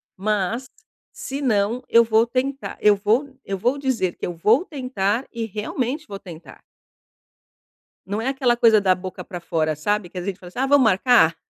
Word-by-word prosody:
mas, 215 +5 -1 0.5
se 275 +2 -6
não, 225 -1 +1
eu 235 0 +6
vou 220 0 +3
tentar, 260 +3 -3
eu 210 -1 +6
vou 230 +8 0
eu 195 - -4
vou 245 +8 0
dizer 255 -10 -1
que - - -5
eu 175 - -4
vou 215 - +3
tentar 255 - -2
e 230 -1 -4
realmente 245 - -3
vou 200 -1 -7
tentar. 165 -7 -12 1.4
Não 205 +4 -3
é 245 - -3
aquela 260 -3 +1
coisa 225 -3 +5
da 185 -2 +3
boca 185 0 -7
pra 180 -3 -7
fora, 160 -2 -1
sabe, 200 +4 -1
que 185 - -11
a 180 - -2
gente 195 +1 -4
fala 180 - -12
assim: 240 - -8
"Ah, 265 - +2
vamos 285 -1 +5
marcar?" 215 -5 +4
215 Hz, 190 wpm, -22 LUFS, 190-255 Hz, 1.4 s, eu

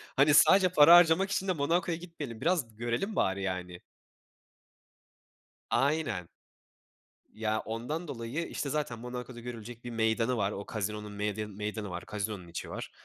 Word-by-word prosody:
hani, 145 +2 +5
sadece 190 +5 +7
para 170 -1 +8
harcamak 175 +3 +5
için 195 - -1
de 185 - +2
Monako'ya 165 +3 0
gitmeyelim. 155 -9 -8
Biraz 155 -10 0
görelim 120 - -2
bari, 95 +1 +1
yani. 90 -2 -4 1.9
Aynen. 135 - 0 1.1
Ya, 110 0 -1
ondan 135 +10 -4
dolayı, 130 +6 -4
işte, 140 - -4
zaten 145 -6 -2
Monako'da 125 0 -7
görülecek 120 0 -8
bir 120 - -6
meydanı 115 +2 +1
var. 100 -1 0
O 100 0 -6
casino'nun 105 0 -3
medyanı 105 0 -3
meydanı, 105 -3 -4
casino'nun 105 -3 -4
içi 85 - -6
var. - - -6
120 Hz, 140 wpm, -30 LUFS, 105-155 Hz, 1.9 s, para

